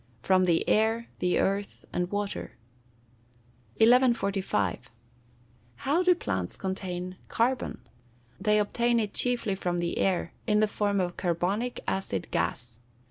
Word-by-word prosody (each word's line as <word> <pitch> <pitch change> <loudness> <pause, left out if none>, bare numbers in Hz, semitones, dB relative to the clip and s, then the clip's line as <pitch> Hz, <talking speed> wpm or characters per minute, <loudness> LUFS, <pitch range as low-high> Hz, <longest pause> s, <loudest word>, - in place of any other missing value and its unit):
_ - - -17
From 185 -1 +4
the 170 -2 +2
air, 225 +2 +2
the 180 0 +1
earth, 200 +1 -1
and 180 0 -1
water. 205 0 -4 1.2
1145. 215 - +2 0.9
How 290 - +1
do 365 -1 +5
plants 95 - -3
obtain 185 -1 -4
carbon? 250 +3 0 0.6
They 210 +2 +3
obtain 235 +3 +2
it 210 -2 -2
chiefly 245 -5 0
from 180 -2 -2
the 170 0 -2
air, 180 -3 0
in 210 -1 +3
the 215 - +4
form 205 -1 0
of 175 -2 -2
carbonic 190 +7 -1
acid 145 - -2
gas. 120 -1 -2
200 Hz, 130 wpm, -28 LUFS, 180-225 Hz, 1.2 s, do